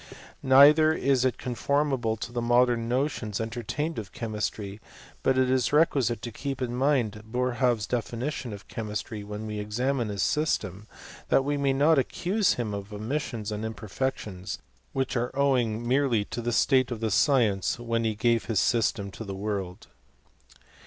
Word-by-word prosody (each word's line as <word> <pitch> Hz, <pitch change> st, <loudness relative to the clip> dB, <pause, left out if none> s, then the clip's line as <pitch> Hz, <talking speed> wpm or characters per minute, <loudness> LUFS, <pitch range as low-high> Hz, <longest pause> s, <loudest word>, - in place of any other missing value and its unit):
Neither 145 Hz, +4 st, +7 dB
* -, -, -3 dB
is 130 Hz, -2 st, +3 dB
it 130 Hz, -, +1 dB
conformable 130 Hz, -2 st, 0 dB
to 115 Hz, -, -6 dB
jthe 120 Hz, -, -1 dB
modem 120 Hz, -1 st, +3 dB
notions 125 Hz, -5 st, -1 dB
entertained 120 Hz, +7 st, -3 dB
of 100 Hz, -3 st, -8 dB
chemistry; 105 Hz, -2 st, -4 dB, 0.4 s
but 130 Hz, -, +2 dB
it 130 Hz, 0 st, +3 dB
is 130 Hz, -2 st, +1 dB
requisite 135 Hz, -7 st, +2 dB
to 120 Hz, -, -4 dB
keep 135 Hz, +4 st, -4 dB
in 120 Hz, -2 st, -2 dB
mind 125 Hz, -6 st, +1 dB
Boerhaave's 125 Hz, -2 st, +1 dB
definition 120 Hz, +3 st, -3 dB
of 100 Hz, -1 st, -9 dB
chemistry, 105 Hz, -1 st, -5 dB
when 105 Hz, +1 st, -6 dB
we 105 Hz, -1 st, -4 dB
examine 120 Hz, +3 st, -1 dB
his 100 Hz, -1 st, -1 dB
system, 105 Hz, -, -1 dB, 0.4 s
that 135 Hz, -, +3 dB
we 145 Hz, +1 st, 0 dB
may 140 Hz, -1 st, +1 dB
not 145 Hz, +2 st, +4 dB
accuse 185 Hz, -, +1 dB
him 115 Hz, -4 st, -3 dB
of 100 Hz, +1 st, -6 dB
omissions 110 Hz, 0 st, -3 dB
and 105 Hz, +1 st, -4 dB
imperfections, 110 Hz, -3 st, -4 dB, 0.3 s
which 135 Hz, 0 st, -2 dB
are 120 Hz, 0 st, 0 dB
owing 120 Hz, -5 st, +1 dB
merely 125 Hz, -5 st, +2 dB
to 120 Hz, -, -5 dB
the 120 Hz, +1 st, -1 dB
state 130 Hz, +2 st, +3 dB
of 120 Hz, -3 st, -4 dB
the 110 Hz, -1 st, -1 dB
science 110 Hz, -5 st, +2 dB
when 115 Hz, -1 st, -1 dB
he 110 Hz, -1 st, 0 dB
gave 115 Hz, +1 st, +1 dB
his 110 Hz, -4 st, +1 dB
system 110 Hz, -4 st, +1 dB
to 110 Hz, -, -8 dB
the 100 Hz, -2 st, -6 dB
world. 95 Hz, -3 st, -4 dB
120 Hz, 165 wpm, -27 LUFS, 105-135 Hz, 0.4 s, Neither